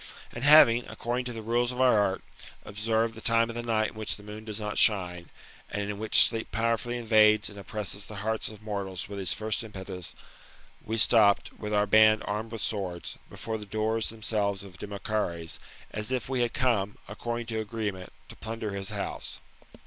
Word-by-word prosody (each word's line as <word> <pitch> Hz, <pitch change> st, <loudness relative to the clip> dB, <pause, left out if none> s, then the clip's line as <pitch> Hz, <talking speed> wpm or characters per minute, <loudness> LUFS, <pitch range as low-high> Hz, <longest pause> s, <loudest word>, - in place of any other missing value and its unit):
And 120 Hz, -, -7 dB
having, 130 Hz, -5 st, +7 dB
according 125 Hz, +2 st, -3 dB
to 125 Hz, -, -4 dB
the 110 Hz, -1 st, -7 dB
rules 120 Hz, +2 st, +1 dB
of 125 Hz, -, -6 dB
our 125 Hz, -4 st, +5 dB
art, 95 Hz, -2 st, 0 dB, 0.4 s
observed 110 Hz, +2 st, 0 dB
the -, -, -10 dB
time 115 Hz, 0 st, +2 dB
of 120 Hz, 0 st, -5 dB
night 110 Hz, -1 st, +2 dB
in -, -, -15 dB
which 110 Hz, -1 st, -2 dB
the 105 Hz, -, -14 dB
moon 105 Hz, +1 st, -9 dB
does 110 Hz, -1 st, -4 dB
not 105 Hz, -1 st, -2 dB
shine, 90 Hz, -5 st, +2 dB, 0.4 s
and 105 Hz, 0 st, -2 dB
in 100 Hz, -, -7 dB
which 110 Hz, 0 st, +6 dB
sleep 115 Hz, -1 st, -4 dB
powerfully 115 Hz, +2 st, 0 dB
invades 110 Hz, -2 st, +4 dB
and 100 Hz, -, -10 dB
oppresses 100 Hz, 0 st, -4 dB
the 105 Hz, -, -9 dB
hearts 110 Hz, 0 st, 0 dB
of 110 Hz, -1 st, -12 dB
moHiis 100 Hz, -3 st, -4 dB
with 100 Hz, -1 st, -6 dB
his 95 Hz, -4 st, +1 dB
first 110 Hz, +2 st, -1 dB
impetus, 95 Hz, -4 st, -6 dB, 0.7 s
we 110 Hz, +1 st, -3 dB
stopped, 105 Hz, -2 st, +5 dB
with 105 Hz, -1 st, -6 dB
our 105 Hz, 0 st, +3 dB
band 110 Hz, +1 st, +6 dB
armed 105 Hz, +2 st, -3 dB
with 115 Hz, -3 st, -5 dB
swords, 95 Hz, -5 st, -3 dB
before 110 Hz, -1 st, -5 dB
the 105 Hz, -, -7 dB
doors 110 Hz, +2 st, 0 dB
themselves 105 Hz, -3 st, -1 dB
o' 100 Hz, -, -11 dB
Demochares, 95 Hz, -3 st, -3 dB, 0.3 s
as 105 Hz, +3 st, -4 dB
if 125 Hz, -5 st, -1 dB
we 130 Hz, -1 st, 0 dB
had 120 Hz, -1 st, 0 dB
come, 105 Hz, -6 st, +1 dB
according 120 Hz, +3 st, -4 dB
to 115 Hz, -1 st, -3 dB
agreement, 105 Hz, -4 st, -4 dB, 0.2 s
to -, -, -10 dB
plunder 110 Hz, -1 st, -5 dB
his 100 Hz, -1 st, -3 dB
house. -, -, -4 dB
110 Hz, 190 wpm, -28 LUFS, 100-115 Hz, 0.7 s, having